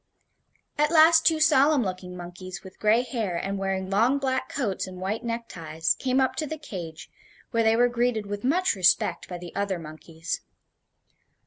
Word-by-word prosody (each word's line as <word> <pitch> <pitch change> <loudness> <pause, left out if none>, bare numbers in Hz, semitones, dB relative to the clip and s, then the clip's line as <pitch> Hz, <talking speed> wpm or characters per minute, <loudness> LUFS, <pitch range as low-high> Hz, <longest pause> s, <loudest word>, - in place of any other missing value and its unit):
At 300 0 +3
last 325 0 +6
two 320 -1 +3
solemn 300 -3 +4
looking 185 -2 -5
monkeys 180 +2 -8
with 190 -1 -13
gray 220 +3 +3
hair, 220 -9 -3
and 195 +2 -3
wearing 190 -1 -2
long 235 +8 +3
black 265 +1 -1
coats 250 - -2
and 185 -1 -9
white 205 +5 -3
neckties, 170 -9 -2
came 260 0 +1
up 260 -1 +1
to 310 - -2
the 315 - -5
cage, 175 - -8 0.4
where 230 - +2
they 220 0 +4
were 245 +1 +4
greeted 240 -3 0
with 205 0 -5
much 345 +9 +2
respect 180 -2 +2
by 180 - -5
the 175 0 -10
other 200 -2 -1
monkeys. 160 0 -6
210 Hz, 175 wpm, -26 LUFS, 185-260 Hz, 0.4 s, last